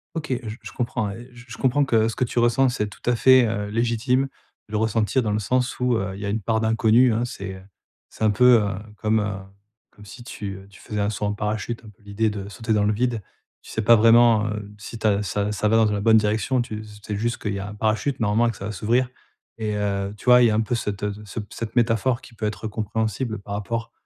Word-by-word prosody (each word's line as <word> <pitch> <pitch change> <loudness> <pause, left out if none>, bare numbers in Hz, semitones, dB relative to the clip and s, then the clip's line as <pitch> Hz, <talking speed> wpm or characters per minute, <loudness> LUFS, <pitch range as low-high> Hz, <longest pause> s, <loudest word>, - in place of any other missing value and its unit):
OK, 155 -2 -4
j 110 0 -7
je 110 +1 -9
comprends, 120 -4 -2
et 120 +5 -10
j 120 0 -14
je 115 - -9
comprends 140 +2 +2
que, 115 -4 +3
ce 115 - -3
que - - 0
tu 120 - -1
ressens, 120 +3 +3
c'est 105 -4 -2
tout 105 - -14
à 125 - +2
fait, 130 +1 +6
heu, 105 -2 -2
légitime. 120 +4 +1 0.4
Le 105 0 -3
ressentir 110 +3 +1
dans 105 - -1
le 105 - 0
sens 125 +4 -1
où, 125 -1 +2
heu, 100 -2 -2
il - - -9
y - - -3
a - - -2
une 110 +2 -1
part 110 +2 0
d'inconnu, 115 +2 +4
hein, 115 +2 0
c'est, 100 -5 -6
heu, 95 - -11 0.5
c'est - - -7
un 110 - +4
peu, 125 +2 +6
heu, 100 - -1 0.3
comme, 110 +1 +1
heu, 100 -1 -2 0.6
comme 105 - -16
si 120 +4 -11
tu, 100 -5 -6
heu, 95 +1 -12
tu 95 - -17
faisais 105 -1 -5
un 100 - +1
saut 105 0 -3
en 105 - 0
parachute, 105 +2 -3
un - - -10
peu 105 - -21
l'idée 100 +2 0
de 100 -1 -6
sauter 115 +1 -2
dans 105 -1 +2
le 105 - +2
vide. 120 0 -1 0.4
Tu - - -13
sais 110 - -1
pas 115 +2 +7
vraiment, 115 -1 +5
heu, 105 -1 -5
si 110 +2 -8
tu 110 - -6
as 100 -1 +3
ça 100 +2 -1
ça 105 0 0
va 110 - +3
dans 110 -1 +4
une 105 -1 -1
bonne 110 +2 +5
direction. 110 +4 +1
Tu 110 -3 -5
s 105 -1 -12
sais 105 - -3
juste 120 +3 -1
qu'il 105 - -3
y 100 - -3
a 100 +1 -5
un 105 - -9
parachute, 110 +6 0
normalement, 110 +1 +2
et - - +1
que 105 - -12
ça 100 - -6
va 105 - -3
s'ouvrir. 115 +6 +1 0.5
Et 105 -1 -2
heu, 100 -1 -1
tu - - -15
vois, 125 0 +7
il 120 - +6
y - - +3
a 105 - +1
un 110 - +2
peu 110 - -2
cette 105 -3 -2
ce 105 - -11
ce 105 +3 -6
cette 115 0 -6
métaphore, 120 +1 +2
qui 125 - -15
peut 110 -1 -4
être 105 +1 -4
compréhensible, 110 +1 -2
par 100 +1 -8
rapport 115 +3 -3
110 Hz, 270 wpm, -23 LUFS, 105-120 Hz, 0.6 s, pas